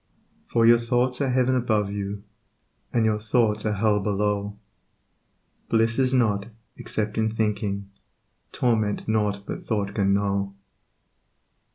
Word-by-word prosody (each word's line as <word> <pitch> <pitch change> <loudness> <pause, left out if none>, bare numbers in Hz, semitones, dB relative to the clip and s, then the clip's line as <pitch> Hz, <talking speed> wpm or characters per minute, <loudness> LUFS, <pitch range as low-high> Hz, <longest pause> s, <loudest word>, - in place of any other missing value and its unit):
For 115 -1 +2
your 120 0 +7
thoughts 125 +2 0
are 135 - +1
heaven 130 0 +2
above 110 -5 +1
you, 100 0 -4 0.7
And 115 -2 +2
your 105 -1 +1
thoughts 110 -1 +1
are 105 - +1
hell 105 0 +2
below, 105 0 -1 1.1
Bliss 115 +2 +2
is 130 -1 +3
not, 110 -5 +1 0.3
except 105 0 -2
in 110 0 +2
thinking, 105 -2 -2 0.6
Torment 110 -4 0
nought 105 -2 0
but - - -5
thought 100 -3 -2
can 100 -2 +1
know. 100 -1 -1
105 Hz, 130 wpm, -25 LUFS, 100-115 Hz, 1.1 s, your